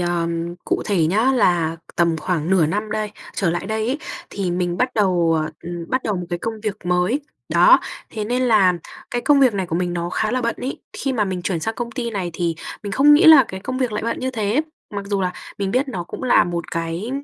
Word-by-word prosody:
ờm, 170 -1 -1
cụ - - 0
thể 175 -6 +2
nhá 220 +10 +3
là 170 -9 +2 0.2
tầm 170 -1 +2
khoảng 160 +1 -2
nửa 185 -5 +4
năm 210 +6 -2
đây 215 -1 -2 0.2
trở 185 -4 +1
lại 175 +3 -3
đây 220 +1 -1
ấy 265 +5 -1 0.3
thì 195 -3 -2
mình 175 0 -1
bắt 250 +6 +2
đầu, 180 -6 +2
ờ, 155 - -5
ừm, 170 0 -5
bắt 255 0 0
đầu 210 -3 -1
một 180 -1 -4
cái 175 - -1
công 225 +4 -3
việc 210 -3 -2
mới. 180 +10 +1 0.3
Đó, - - +6 0.3
thế 215 -1 -4
nên 250 +3 0
là 215 -7 +5 0.4
cái 240 - -2
công 290 -1 +4
việc 255 -5 +5
này 190 -2 -1
của 165 - -2
mình 175 0 -1
nó 175 0 -3
khá 215 - 0
là 250 0 0
bận 235 - 0
ấy. 260 +2 -4
Khi 270 - -2
mà 220 -5 +1
mình 185 -2 -3
chuyển 175 -3 -1
sang 225 +6 -2
công 240 -1 -4
ty 235 -1 -3
này 190 -5 -3
thì 170 0 -1 0.3
mình 205 -1 -5
không 290 +5 +6
nghĩ 330 +5 +5
là 315 -5 +9
cái 190 0 -6
công 255 +4 -4
việc 250 -4 0
lại 210 - -2
bận 230 - -2
như 260 - -1
thế, 225 +2 0 0.3
mặc 200 -1 -4
dù 200 -1 -1
là 180 -1 0 0.3
mình 195 -1 -1
biết 265 +4 +1
nó 180 -9 -4
cũng 175 - -8
là 255 - +5
một 170 -1 -4
cái 165 +6 -3
200 Hz, 250 wpm, -21 LUFS, 175-235 Hz, 0.4 s, là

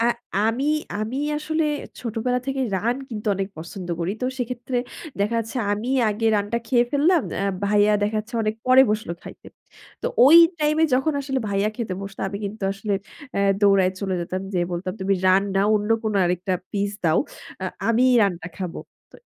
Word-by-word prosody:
অ্যা 230 - +3 0.4
আমি, 250 +5 -1 0.4
আমি 225 +5 -3 0.2
আসলে 315 +1 -1 0.4
ছোটবেলা 245 +2 -1
থেকে 270 0 -2 0.2
রান 235 +6 0
কিন্তু 215 -3 -6
অনেক 195 0 -2
পছন্দ 175 +2 -7
করি। 170 +4 -1
তো - - +1
সেক্ষেত্রে 245 +1 -3 0.4
দেখা 210 +3 +1
যাচ্ছে 225 +4 -7 0.2
আমিই 245 +6 0
আগে 225 +2 -1
রান্না 205 +3 -1
খেয়ে 240 +1 +3
ফেললাম। 310 +3 +3
অ্যা 195 - -1 0.2
ভাইয়া 210 +1 +4
দেখা 210 +1 0
যাচ্ছে 235 +3 -13
অনেক 215 0 0
পরে 255 +1 +7
বসলো 215 -5 -2
খাইতে। - - -12 0.6
তো - - 0 0.2
ওই 320 - +9 0.2
টাইম 300 0 +1
এ - - +7
যখন 270 +4 +1
আসলে 270 -1 -2
ভাইয়া 200 +1 +1
খেতে 220 -6 -3
বসত 195 0 -8
আমি 200 +1 -5
কিন্তু 205 +1 -6
আসলে 205 +1 -2 0.4
অ্যা 200 - 0 0.2
দৌড়ায় 195 -2 +4
চলে 195 -2 -1
যেতাম, 185 +2 -3
যেয়ে 175 -1 0
বলতাম, 180 +1 -3
"তুমি 195 +1 +1
রান 190 +1 +5
না 195 - +4
অন্য 210 +1 0
কোনো 215 -2 -1
আরেকটা 180 +2 -1 0.2
পিস 200 0 0
দাও। 160 0 +4 0.4
আ - - -1 0.2
আমিই 250 +3 +4
রান্না 180 -3 -1
খাবো।" 185 -3 -5 0.3
তো - - -15
210 Hz, 185 wpm, -23 LUFS, 195-250 Hz, 0.6 s, ওই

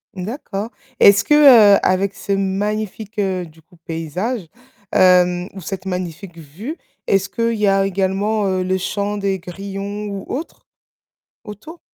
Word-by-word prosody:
D'accord. 210 +1 -5 0.3
Est-ce 200 0 +7
que, - - +2 0.4
heu, - - +2
avec 190 +1 +1
ce 200 - -6
magnifique, 205 +2 -2
heu, 185 -3 -1
du 160 0 -18
coup, 170 +2 -24
paysage, 165 - -4 0.5
hem, 180 -1 +4
ou 195 - -9
cette 185 +3 -6
magnifique 180 -1 -5
vue, 185 - -8 0.3
est-ce 195 0 +1
qu'il 230 +2 -1
y 210 -1 +1
a 195 0 +3
également, 195 +2 0
heu, 185 -1 0
le 185 +1 0
chant 205 +2 -3
des 195 -1 -1
grillons 195 +3 -6
ou 200 -1 -6
autres 305 +6 -6 0.8
autour? 300 - -11
195 Hz, 145 wpm, -19 LUFS, 180-210 Hz, 0.8 s, Est-ce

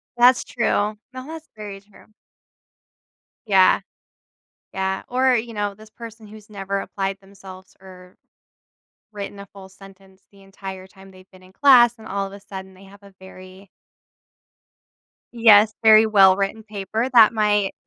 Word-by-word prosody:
That's 245 +1 +4
true. 210 -3 -2 0.2
No, 255 +2 -9
that's 320 0 -10
very 205 -2 -9
true. 205 0 -22 1.4
Yeah. 190 -3 +3 0.9
Yeah, 190 0 -3
or, 255 0 +1
you 230 0 -4
know 205 -1 -3
this 215 +1 -17
person 225 -1 -12
who's 215 0 -15
never 200 -1 -5
applied 195 0 -5
themselves 190 -1 -15
or 185 -1 -16 1.0
written 200 -1 -8
a 200 - -10
full 190 0 -15
sentence 190 0 -19
the 200 -1 -21
entire 190 -1 -10
time 195 0 -18
they've 185 0 -19
been 185 0 -19
in 185 - -19
class 240 -3 +5
and 220 - -12
all 200 0 -3
of 195 - -10
a 200 - -11
sudden 190 -1 -11
they 190 +1 -18
have 200 +1 -18
a 200 -1 -17
very 190 +1 -15 1.7
Yes, 220 -2 +5
very 220 0 +7
well-written 195 +1 +2
paper 215 +2 -4
that 225 -2 +6
might 210 -2 0
200 Hz, 150 wpm, -21 LUFS, 190-220 Hz, 1.7 s, very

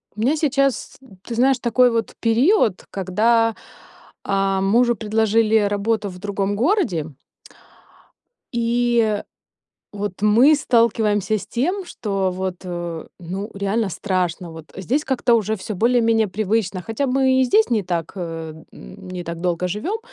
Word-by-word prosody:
У - - -10
меня 260 +7 +2
сейчас, 275 -3 0 0.3
ты 235 - -6
знаешь, 260 +2 +3
такой 245 +1 +3
вот 230 -3 -2
период, 230 - +2
когда, 225 +4 +1 0.7
а, 195 0 0
мужу 240 +5 +3
предложили 220 +1 +2
работу 205 +1 0
в 180 -1 -10
другом 200 0 -2
городе 220 - 0 1.4
и 235 -2 +1 0.7
вот 205 -2 -5
мы 235 +8 +6
сталкиваемся 220 -5 +2
с - - -9
тем, 360 +11 -1
что 195 - -2
вот, 185 0 -3
э, 175 -2 -5
ну, 190 +5 -5
реально 200 +2 -1
страшно, 180 -1 -2
вот. 160 -1 -12
Здесь 245 - -1
как-то 255 -2 +2
уже 220 -1 +1
всё 210 +2 -6
более-менее 225 0 +2
привычно, 200 -1 -1
хотя 225 +8 -2
мы 260 0 +3
и - - +4
здесь 430 - +3
не 220 -3 +2
так, 170 -3 -3
э, 165 -3 -5 0.2
не 185 -2 -9
так 170 -1 -6
долго 180 0 -1
живём, 215 - -3
215 Hz, 135 wpm, -21 LUFS, 190-240 Hz, 1.4 s, мы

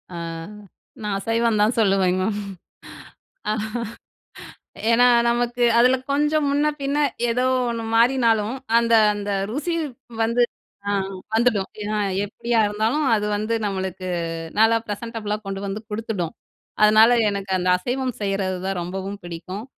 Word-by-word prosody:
அ - - -5 0.8
நான் 210 -2 -2
அசைவம் 225 +1 +1
தான் 215 +3 +3
சொல்லுவேங்க 190 -3 +2 1.0
மேம். 215 - -4 1.2
ஏன்னா 245 +2 +5 0.2
நமக்கு 240 +1 0 0.2
அதில 250 +2 +5 0.2
கொஞ்சம் 295 +1 +2
முன்ன 290 +1 +2
பின்னே 280 +2 0 0.3
ஏதோ 250 +2 +1 0.3
ஒண்ணு 230 -1 -3
மாறினாலும், 230 -2 +3 0.2
அந்த 235 0 +1 0.2
அந்த 205 0 -4 0.2
ருசி 305 +8 -2 0.5
வந்து 235 +2 +2 0.5
அ - - +1 0.4
வந்துடும் 225 -4 +2 0.2
ஏனா, 215 +1 -2 0.3
எப்டியா 235 +3 -2
இருந்தாலும் 220 +8 0
அது 210 -1 0
வந்து 215 +2 -1
நம்மளுக்கு 190 -2 -4 0.5
நல்லா 225 +1 +5
ப்ரெசென்டபுள்ளா 215 0 -4
கொண்டு 195 0 -4
வந்து 200 +2 -4
குடுத்துடும். 210 -6 -3 0.5
அதனால 215 +2 +7 0.2
எனக்கு 200 -1 -5
அந்த 180 0 -1
அசைவம் 250 +5 -2
செய்றதுதான் 190 -1 -2
ரொம்பவும் 195 +3 -5
பிடிக்கும். 180 +5 -7
220 Hz, 120 wpm, -22 LUFS, 195-240 Hz, 1.2 s, அதனால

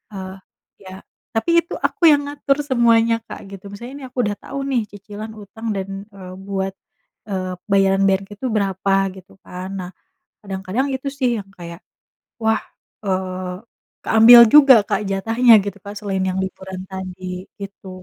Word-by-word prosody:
eee, 190 0 -7 0.5
ya, 185 0 -10 0.4
tapi 335 +10 +3
itu 335 - -6
aku - - -12
yang 290 - +4
ngatur 285 -1 0
semuanya 230 -4 +3
Kak, - - -8
gitu. 195 -1 -10
Misalnya, 240 +6 -9
nih, - - -7
aku - - -24
udah 205 -1 -1
tau, 275 - -7
nih, 270 -4 0
cicilan 210 +2 -8
utang 215 +2 -9
dan, 195 +1 -5
eee, 190 -3 -11
buat, 195 -1 -2 0.6
eee, 185 -2 -3 0.2
bayaran-bayaran 195 0 +3
itu 205 +6 -8
berapa 195 -1 0 0.2
gitu, 190 +1 -15
kan. 180 +1 -7
Nah, 180 0 -6 0.5
kadang-kadang 195 +6 -2
itu, 265 +1 -6
sih, 255 -3 +2
yang 195 - -12
kayak, 170 -1 -8 0.6
wah, 220 0 +2 0.4
eee, 185 -1 -2 0.5
keambil 225 +2 +9
juga 275 +1 +8
Kak, 200 - 0
jatahnya 225 +5 +3
gitu, 200 -1 -5
kan, 205 0 -7
selain 195 -2 -2
yang 185 0 -2
liburan 190 0 -6
tadi, 185 -1 -7
gitu. 200 -1 -9
200 Hz, 155 wpm, -20 LUFS, 190-230 Hz, 0.6 s, keambil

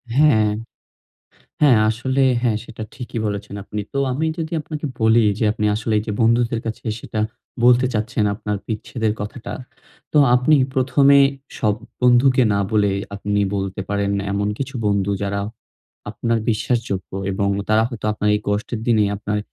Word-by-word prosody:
হ্যাঁ। 120 -8 +4 1.1
হ্যাঁ, 135 -6 +6
আসলে 130 +5 0 0.2
হ্যাঁ 115 -4 +1
সেটা 110 -1 -8
ঠিকই 120 -3 -6
বলেছেন 100 -1 -4
আপনি। 105 +1 -5
তো 140 - 0
আমি 150 +5 -1
যদি 160 0 -4
আপনাকে 150 0 -6
বলি 110 +1 +4 0.2
যে 110 - +2
আপনি 105 -1 -2
আসলে 110 +1 -2
এই - - -5
যে - - -1
বন্ধুদের 115 0 +2
কাছে 110 -1 -5 0.2
সেটা 110 - -5 0.4
বলতে 125 +1 +5
চাচ্ছেন 110 +1 -1
আপনার 105 -1 -3
বিচ্ছেদের 110 0 -2
কথাটা। 110 +3 -6 0.6
তো - - +4 0.2
আপনি 125 +5 +4 0.2
প্রথমে 135 +2 +4 0.4
সব 105 -2 +2 0.3
বন্ধুকে 125 +1 +5
না 100 - +1
বলে 105 -2 +3 0.2
আপনি 105 0 -1 0.2
বলতে 95 -1 -3
পারেন 100 0 0 0.2
এমন 100 +1 0
কিছু 130 -1 -5
বন্ধু 100 -1 +1
যারা, 100 0 -1 0.7
আপনার 115 +2 -1
বিশ্বাসযোগ্য 110 -3 -2 0.2
এবং 100 +1 0 0.2
তারা 110 +1 +4
হয়তো 120 -4 -8
আপনার 105 0 -1
এই 105 - 0
কষ্টের 110 +2 -2
দিনে 110 -3 +4
আপনার 105 +1 -2
110 Hz, 155 wpm, -21 LUFS, 105-125 Hz, 1.1 s, হ্যাঁ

